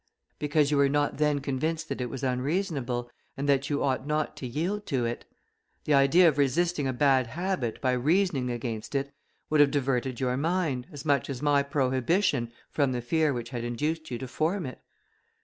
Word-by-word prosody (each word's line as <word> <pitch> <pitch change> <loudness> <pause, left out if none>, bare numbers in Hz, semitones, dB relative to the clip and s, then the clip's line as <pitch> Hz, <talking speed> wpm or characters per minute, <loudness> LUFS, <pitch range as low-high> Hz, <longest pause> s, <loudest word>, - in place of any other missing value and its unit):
"Because 150 0 +2
you 145 - +2
were 140 -1 +4
not 145 +1 0
then 150 -2 +2
convinced 155 +4 -2
that - - -4
it 125 - -2
was 135 +1 -6
unreasonable, 130 -2 -1 0.3
and 140 +1 -2
that 140 0 +2
you 145 -1 0
ought 130 0 0
not 150 0 -1
to 130 - -5
yield 175 - -2
to 130 -5 0
it. 115 +1 -4 0.6
The 150 - +1
idea 140 +6 +6
of 145 -3 +2
resisting 150 +2 +1
a - - +1
bad 130 -1 +3
habit, 165 - -2
by 130 - +2
reasoning 145 +1 +1
against 115 0 -4
it, 140 +1 -1 0.4
would 155 - +3
have 145 -1 +7
diverted 130 -3 -1
your 125 -1 0
mind, 155 -5 -1
as 145 -1 -9
much 140 -4 +1
as 135 0 -5
my 145 -1 +4
prohibition, 130 - +1 0.2
from 140 -3 +1
the 120 - -2
fear 155 +4 +2
which 120 -3 -4
had 120 -2 -4
induced 150 +7 -2
you 120 - -3
to 130 - -6
form 160 +8 -1
it." 130 - -7
140 Hz, 195 wpm, -28 LUFS, 125-155 Hz, 0.6 s, have